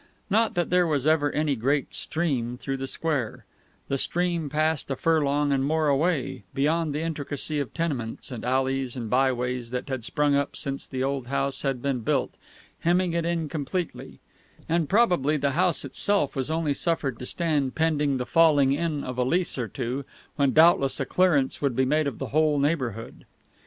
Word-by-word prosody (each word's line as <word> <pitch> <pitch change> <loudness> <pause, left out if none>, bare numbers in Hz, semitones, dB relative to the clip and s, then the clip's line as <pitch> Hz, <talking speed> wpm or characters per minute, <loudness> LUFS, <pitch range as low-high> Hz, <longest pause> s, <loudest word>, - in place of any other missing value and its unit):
Not 225 +2 +2
that 175 -1 0
there 180 -1 +4
was 145 -4 0
ever 155 -2 +3
any 150 -1 0
great 135 +4 0
"stream" 130 -8 -2
through 135 +1 -4
the 135 0 -4
square; 140 -6 -3 0.4
the 135 - -1
stream 170 -2 -1
passed 155 +1 0
a 135 - -1
furlong 145 -2 +1
and 135 -1 +1
more 155 +1 +1
away, 140 - 0
beyond 155 +3 +1
the 150 - -1
intricacy 150 -1 -3
of 140 - -3
tenements 140 -9 -3
and 120 - -6
alleys 130 0 0
and 115 -4 -5
byways 125 -2 +1
that 125 +3 -4
had 130 -3 -3
sprung 145 +4 +1
up 140 0 0
since 140 0 -3
the 130 -1 -3
old 135 -2 -2
house 140 0 -1
had 135 -3 -2
been 140 -3 0
built, 110 - 0 0.5
hemming 175 +1 +1
it 170 -1 0
in 170 -2 -1
completely; 160 +4 -4 0.5
and 165 -2 0
probably 175 - +3
the 140 -1 0
house 175 0 +1
itself 195 +2 0
was 135 0 -2
only 160 -2 0
suffered 140 -6 -1
to 125 - -6
stand 150 -6 0
pending 150 -4 +1
the 125 - -3
falling 150 -4 +4
in 150 0 -1
of 125 0 -5
a - - +3
lease 170 +7 0
or 125 -4 -2
two, 125 +5 -4 0.3
when 140 -2 +2
doubtless 155 -4 +4
a 135 - 0
clearance 155 -5 +2
would 140 -4 0
be 130 +1 +2
made 150 +3 +1
of 135 - -4
the 135 - -5
whole 155 -1 +3
neighbourhood. 130 -7 -2
145 Hz, 185 wpm, -26 LUFS, 130-160 Hz, 0.5 s, there